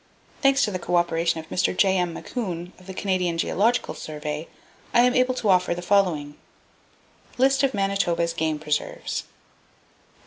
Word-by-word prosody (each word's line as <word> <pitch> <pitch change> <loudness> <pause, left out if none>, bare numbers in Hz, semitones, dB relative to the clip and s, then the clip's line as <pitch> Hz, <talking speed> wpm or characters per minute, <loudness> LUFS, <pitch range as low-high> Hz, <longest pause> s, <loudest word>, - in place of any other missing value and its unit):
Thanks 275 0 +4
to 210 - -3
the 185 - -3
cooperation 170 -1 +1
of 160 - -10
Mr. 180 0 0
J.M. 190 -3 +3
Macoun, 180 -7 -5
of 185 - -17
the 190 - -6
Canadian 185 -4 0
Geological 220 +8 +1
Survey, 150 0 -5 0.5
I 240 - +7
am 250 0 +4
able 255 0 +2
to 225 -4 -1
offer 180 -2 +3
the 175 - -6
following: 175 -7 +1 1.0
List 270 +1 +3
Of 270 -3 +1
Manitoba's 195 -4 0
Game 160 -1 -1
Preserves 150 -1 -3
Sq. - - -4
180 Hz, 150 wpm, -24 LUFS, 165-205 Hz, 1.0 s, I